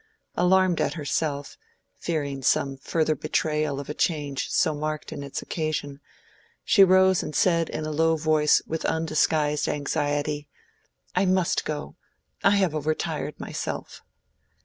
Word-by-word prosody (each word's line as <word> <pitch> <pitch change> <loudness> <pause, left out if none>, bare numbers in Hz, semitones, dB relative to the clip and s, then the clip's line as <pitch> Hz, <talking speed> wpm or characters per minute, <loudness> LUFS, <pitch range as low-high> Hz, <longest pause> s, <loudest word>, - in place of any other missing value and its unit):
Alarmed 185 -1 +3
at - - 0
herself—fearing 145 -1 -4
some 135 +1 +1
further 155 +3 0
betrayal 150 -1 -1
of 140 - -7
a 150 - -4
change 145 -4 -1
so 155 - +2
marked 155 +1 -4
in 145 - -6
its 140 -1 -5
occasion, 150 -3 -3 0.6
she 200 - +6
rose 190 0 +5
and 150 - -6
said 170 -3 +2
in 155 - -4
a 155 - -3
low 160 +1 +2
voice 155 -1 +3
with 160 0 -4
undisguised 155 -2 +1
anxiety, 145 0 -1 0.7
"I 190 - +2
must 185 -2 +1
go; 150 +3 -5 0.5
I 200 - +5
have 190 -5 +2
overtired 155 0 -2
myself." - - -5
155 Hz, 130 wpm, -25 LUFS, 145-165 Hz, 0.7 s, she